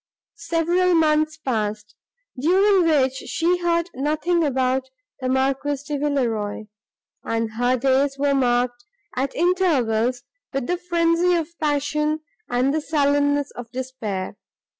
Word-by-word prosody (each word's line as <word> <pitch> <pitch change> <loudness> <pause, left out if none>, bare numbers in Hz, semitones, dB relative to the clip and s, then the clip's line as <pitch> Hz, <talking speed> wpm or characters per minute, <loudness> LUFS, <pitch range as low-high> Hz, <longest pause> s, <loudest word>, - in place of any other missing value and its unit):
Several 345 +2 +2
months 310 -1 +2
passed, 215 -5 -3 0.4
during 370 +6 +3
which 265 -4 +3
she 335 +6 -1
heard 340 -1 +1
nothing 305 +5 0
from 260 -3 +1 0.4
the 255 -1 -2
Marquis 270 +2 0
de 295 -2 -2
Villeroi, 235 -8 -1 0.6
and 230 -1 -2
her 245 +3 +1
days 270 +2 +1
were 280 0 +1
marked, 245 -2 +1 0.3
at 265 +2 -2
intervals, 255 -10 +1 0.3
with 270 -2 -1
the 355 +4 -1
frenzy 345 0 +2
of 330 -2 -1
passion 300 +1 0 0.3
and 250 +3 +1
the 310 - 0
sullenness 285 -1 +1
of 240 -1 -9
despair. 230 -7 -5
280 Hz, 120 wpm, -22 LUFS, 250-325 Hz, 0.6 s, during